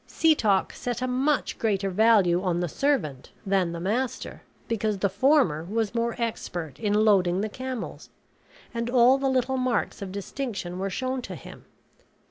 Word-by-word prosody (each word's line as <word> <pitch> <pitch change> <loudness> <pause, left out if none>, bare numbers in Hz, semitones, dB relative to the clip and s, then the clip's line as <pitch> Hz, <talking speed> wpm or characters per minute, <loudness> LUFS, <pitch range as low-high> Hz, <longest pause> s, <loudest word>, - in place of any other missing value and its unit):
Setoc 220 - +2
set 245 0 -4
a - - 0
much 265 +4 0
greater 195 -3 0
value 195 -4 +4
on 180 -2 0
the 175 - 0
servant 155 - -1 0.2
than 190 -3 +1
the 170 - -5
master, 240 +8 -2 0.3
because 215 -2 -1
the 200 +1 +1
former 235 - +3
was 215 +3 -2
more 235 0 -1
expert 175 - -4
in 210 - 0
loading 185 -3 +3
the 215 - -2
camels; 255 0 -6 0.6
and 235 0 -2
all 250 +2 +5
the 270 0 +1
little 260 0 +1
marks 255 -4 -1
of 195 -2 -5
distinction 200 -3 -5
were 195 +1 -1
shown 255 +7 -2
to - - -7
him. - - -12
220 Hz, 160 wpm, -26 LUFS, 190-255 Hz, 0.6 s, all